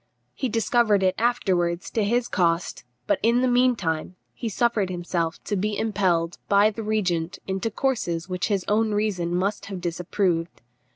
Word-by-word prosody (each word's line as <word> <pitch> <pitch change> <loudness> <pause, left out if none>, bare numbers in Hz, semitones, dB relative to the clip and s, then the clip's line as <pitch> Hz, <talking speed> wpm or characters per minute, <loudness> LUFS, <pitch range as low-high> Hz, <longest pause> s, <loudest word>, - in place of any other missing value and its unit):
He 260 - -2
discovered 220 -2 +2
it 185 -1 +3
afterwards 185 -7 0
to 220 - 0
his 240 +4 +1
cost, 170 -5 0 0.2
but - - +1
in 235 +3 +3
the - - +3
meantime 230 -10 +1 0.3
suffered 220 -2 +1
himself 175 -2 -2
to 205 - -2
be 205 +2 -1
impelled 185 -6 0
by 205 +2 +5
the 225 - -6
regent 190 -6 -1
into 190 +4 -2
courses 200 -9 -1
which 180 -1 -2
his 200 -4 0
own 215 0 +2
reason 185 -5 0
must 195 +4 -1
have 195 -2 -5
disapproved. 175 - -1
195 Hz, 155 wpm, -24 LUFS, 175-220 Hz, 0.3 s, by